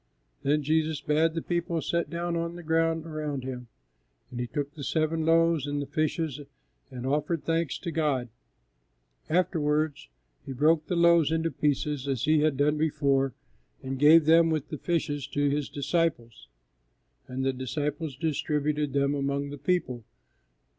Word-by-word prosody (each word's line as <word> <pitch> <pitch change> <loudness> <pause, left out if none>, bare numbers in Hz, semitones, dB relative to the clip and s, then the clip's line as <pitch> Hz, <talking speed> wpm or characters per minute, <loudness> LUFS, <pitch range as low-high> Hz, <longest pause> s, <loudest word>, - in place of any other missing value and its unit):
Then 150 +2 +1
Jesus 155 0 +1
bade 155 +2 +1
the 165 - -2
people 170 -1 -1
sit 170 +1 -1
down 170 0 -2
on 170 0 -2
the 175 - -9
ground 165 0 +1
around 150 -4 -4
Him, 125 -2 -6 0.6
and 120 - -6
He 120 - -2
took 145 +1 -4
the 145 - -8
seven 160 +2 0
loaves 165 -3 +3
and 145 0 -2
the 140 - -3
fishes 155 0 -2 0.5
and 130 -2 -7
offered 150 +4 -1
thanks 165 -1 0
to 170 - -5
God; 145 -7 0 1.0
afterwards, 155 - 0 0.3
He 135 - -6
broke 155 +4 +2
the 180 - -1
loaves 170 -2 +4
into 160 0 0
pieces 145 0 -1
as 135 -4 -1
He 155 0 +4
had 150 -2 +2
done 150 +2 +2
before 140 -4 +1 0.5
and 130 0 -4
gave 155 +2 +7
them, 165 +1 +5
with 155 -2 -2
the 150 - -6
fishes, 145 -5 -1
to 145 0 0
His 145 -1 -1
disciples, 140 - -2 0.8
and 130 +1 -3
the 135 - +1
disciples 145 +3 -3
distributed 150 -1 -1
them 140 0 +2
among 140 0 -2
the 145 - -6
people. 130 -10 -1
150 Hz, 160 wpm, -27 LUFS, 140-165 Hz, 1.0 s, gave